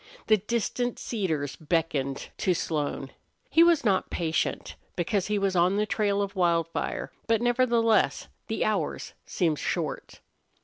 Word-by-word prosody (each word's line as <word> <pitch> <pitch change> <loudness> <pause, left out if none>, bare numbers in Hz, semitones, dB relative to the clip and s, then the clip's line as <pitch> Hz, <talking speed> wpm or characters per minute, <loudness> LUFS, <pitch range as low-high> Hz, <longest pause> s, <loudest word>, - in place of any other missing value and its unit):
The 215 - +5
distant 235 +3 -2
cedars 160 - -2
beckoned 155 -4 -1
to 185 - +2
Slone. 145 -4 -2 0.4
He 325 - +6
was 335 -5 +5
not 195 -3 +2
patient, 160 -2 -2 0.2
because 190 +2 0
he 210 0 0
was 195 -1 0
on 180 +2 +3
the 210 - +2
trail 205 -2 +1
of 200 0 -5
Wildfire; 170 -3 0 0.2
but, 225 -1 +3
nevertheless, 240 -2 +2 0.2
the - - -1
hours - - -2
seemed 160 -6 0
short. - - -3
195 Hz, 135 wpm, -27 LUFS, 165-225 Hz, 0.4 s, He